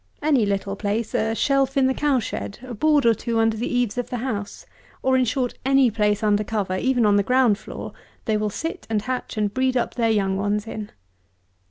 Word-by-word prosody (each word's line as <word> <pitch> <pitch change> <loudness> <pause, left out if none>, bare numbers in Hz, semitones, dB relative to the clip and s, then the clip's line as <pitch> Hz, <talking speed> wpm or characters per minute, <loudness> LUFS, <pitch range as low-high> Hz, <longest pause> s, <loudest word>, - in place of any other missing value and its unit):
Any 275 -8 +3
little 195 0 -2
place, 210 +3 -2
a 225 -2 0
shelf 275 +2 +1
in 270 - +4
the 265 - +2
cow 290 -1 +1
shed; 210 -3 -4
a 255 -1 -7
board 295 +3 +2
or 230 - +6
two 230 +2 -3
under 225 0 +2
the 225 +3 -3
eaves 245 -2 0
of 245 - -4
the 250 - -3
house; 220 -5 -4 0.4
or, 260 0 +3
in 255 -1 +3
short, 245 +1 -1
any 270 -2 +4
place 210 0 +1
under 210 0 +2
cover, 205 -3 -2
even 245 +3 +1
on 205 -1 +4
the - - +4
ground 245 -1 +3
floor, - - -8 0.3
they 220 - +1
will 210 0 0
sit 330 - -5
and 215 -2 0
hatch 250 -2 -4
and 210 -1 0
breed 260 0 +1
up 240 - -1
their 230 -2 +1
young 195 -3 +1
ones 205 +1 -1
in. 215 -2 -6
225 Hz, 220 wpm, -23 LUFS, 210-255 Hz, 0.4 s, or